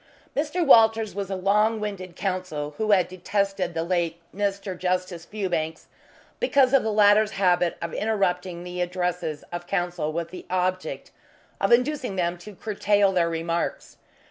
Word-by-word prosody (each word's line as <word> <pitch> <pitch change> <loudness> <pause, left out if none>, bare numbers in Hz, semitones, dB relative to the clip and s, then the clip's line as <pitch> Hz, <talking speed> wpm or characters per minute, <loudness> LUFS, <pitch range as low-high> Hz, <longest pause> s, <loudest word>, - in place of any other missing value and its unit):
Mr. 315 +4 0
Walters 225 -4 +5
was 200 -1 -4
a 195 - -2
long 210 +4 +2
winded 190 -4 -5
Counsel 180 -7 -3
who 215 -1 0
had 190 -4 +4
detested 185 -1 -2
the 165 - 0
late 170 -1 -1 0.2
Mr. 200 -1 -2
Justice 180 -1 -2
Fewbanks 175 -6 -3 0.5
because 275 - +3
of 275 - +6
the 220 - -1
latter's 210 +1 +5
habit 180 -3 +2
of 170 - -4
interrupting 180 -5 -1
the 180 0 -5
addresses 175 -4 -2
of 175 0 -6
Counsel 175 -4 -1
with 170 +1 -4
the 185 - -9
object 185 0 -2 0.5
of - - +1
inducing 250 -3 +2
them 175 -1 0
to 205 +3 -11
curtail 205 -1 +2
their 175 -3 +2
remarks. 165 +1 -3
185 Hz, 150 wpm, -25 LUFS, 175-210 Hz, 0.5 s, of